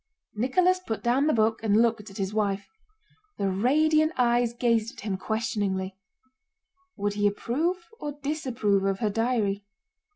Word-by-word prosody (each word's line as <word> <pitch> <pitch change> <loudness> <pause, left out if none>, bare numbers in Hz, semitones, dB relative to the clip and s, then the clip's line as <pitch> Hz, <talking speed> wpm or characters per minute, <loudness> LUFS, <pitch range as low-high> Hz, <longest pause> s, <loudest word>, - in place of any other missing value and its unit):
Nicholas 355 - +2
put 225 -12 -5
down 255 +5 +2
the - - +4
book 225 -2 +2
and 215 -1 +3
looked 225 -2 +1
at 195 - -11
his 195 0 -2
wife. 200 -2 -1 0.7
The 195 -1 0
radiant 310 - +3
eyes 240 -1 +3
gazed 230 -2 0
at - - -9
him 200 -3 -1
questioningly: 195 -2 -2 1.0
would 205 0 -1
he 205 0 +2
approve 330 - -1
or 295 -1 -4
disapprove 260 -9 -1
of 195 -1 +1
her 215 -1 0
diary? 220 -3 0
225 Hz, 150 wpm, -27 LUFS, 205-260 Hz, 1.0 s, the